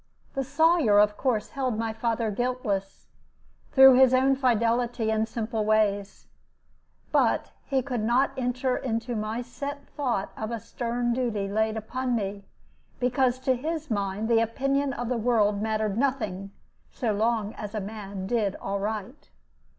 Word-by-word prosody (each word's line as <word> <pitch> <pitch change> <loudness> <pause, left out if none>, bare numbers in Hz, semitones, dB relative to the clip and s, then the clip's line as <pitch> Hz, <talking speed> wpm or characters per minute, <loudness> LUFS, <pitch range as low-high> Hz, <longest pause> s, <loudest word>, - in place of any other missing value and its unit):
The 270 - -1
Sawyer, 315 -6 +3
of 210 0 +4
course, 230 -5 -1
held 260 -6 -2
my 225 0 -2
father 225 0 -1
guiltless, 210 -4 -2 0.7
through 265 -1 +9
his 260 0 +6
own 270 +1 +4
fidelity 235 -2 +1
and 220 0 +1
simple 225 -1 -2
ways; 210 -2 +1 0.9
but - - +2 0.2
he 265 -2 +1
could 250 -4 -2
not 245 +5 +2
enter 255 0 -1
into 235 0 -2
my 215 +3 -3
set 280 +3 -6
thought 250 -9 -2
of 220 - -4
a 230 -1 -3
stern 240 +1 -2
duty 230 -5 -1
laid 220 +2 0
upon 250 +3 -2
me, 200 -2 -3 0.5
because 250 0 +2
to 260 0 +2
his 310 +2 -4
mind 200 +1 -1
the 230 -1 +4
opinion 275 +5 0
of 245 -2 -4
the 250 0 0
world 210 -3 +2
mattered 215 -1 -1
nothing 215 -8 -1 0.4
so 235 -5 -2
long 220 0 0
as 210 +1 -7
a - - 0
man 200 -2 -6
did 205 -2 0
aright. 205 +6 -4
230 Hz, 150 wpm, -26 LUFS, 215-255 Hz, 0.9 s, through